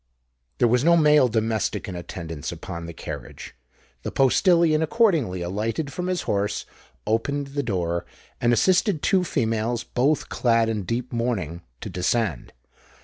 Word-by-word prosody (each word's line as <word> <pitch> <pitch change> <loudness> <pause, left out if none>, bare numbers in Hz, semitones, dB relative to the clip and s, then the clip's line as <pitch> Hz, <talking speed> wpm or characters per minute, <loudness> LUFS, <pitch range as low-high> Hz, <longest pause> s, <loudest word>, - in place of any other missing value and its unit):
There 120 - +4
was 125 +2 +2
no 170 +1 +5
male 150 -4 +5
domestic 110 -2 -1
in 95 - -5
attendance 85 -3 -6
upon 85 -1 -7
the - - -6
carriage: - - -8 0.5
the - - -4
postillion 160 +3 +4
accordingly 160 - +2
alighted 115 - -2
from 180 0 -3
his 185 -1 -1
horse, 100 0 -1 0.4
opened 140 +6 -1
the 140 +1 -2
door, 85 -7 -2 0.3
and 120 - +3
assisted 185 - +2
two 185 -2 +3
females, 115 -5 -1
both 140 +5 0
clad 115 -2 +2
in 105 -4 -2
deep 120 +5 -3
mourning, 105 -9 -2 0.2
to - - -5
descend. 90 - -1
120 Hz, 145 wpm, -24 LUFS, 100-150 Hz, 0.5 s, no